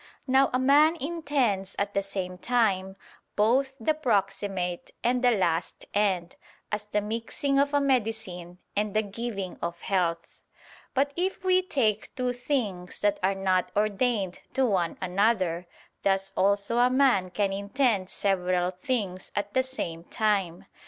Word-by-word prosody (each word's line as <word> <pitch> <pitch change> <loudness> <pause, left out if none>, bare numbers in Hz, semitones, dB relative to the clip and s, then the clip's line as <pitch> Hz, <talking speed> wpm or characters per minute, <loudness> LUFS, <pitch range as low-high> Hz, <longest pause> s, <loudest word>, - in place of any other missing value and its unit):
Now 265 0 +4
a 255 - +2
man 290 +5 +5
intends 280 - -1
at 200 0 -1
the 200 - +1
same 185 -2 -4
time, 195 -5 +1 0.4
both 260 +6 +2
the 235 +7 +2
proximate 195 - -1
and 250 +1 +1
the 250 - +6
last 175 -7 0
end; 190 -4 0 0.3
as 210 0 -2
the 210 0 -1
mixing 230 +6 -1
of 280 0 +2
a 290 - +3
medicine 220 -10 -1 0.2
and 210 0 -1
the 215 - +3
giving 205 -2 -5
of 170 0 -3
health. 170 -4 -1 0.5
But 280 +2 +1
if 370 +2 -2
we 370 0 +4
take 235 - -1
two 250 -1 -1
things 225 -9 -2
that 205 -1 +2
are 190 +1 +2
not 185 -1 +1
ordained 210 -2 0
to 265 - +2
one 185 -7 0
another, 185 -2 +1 0.3
thus 195 0 0
also 200 +4 +2
a 245 +1 +5
man 255 -8 +3
can 195 +1 0
intend 200 -1 0
several 180 -2 +1
things 185 -1 -3
at 205 0 -2
the 260 - +4
same 175 -11 -4
time. 195 -6 0
205 Hz, 145 wpm, -27 LUFS, 185-250 Hz, 0.5 s, the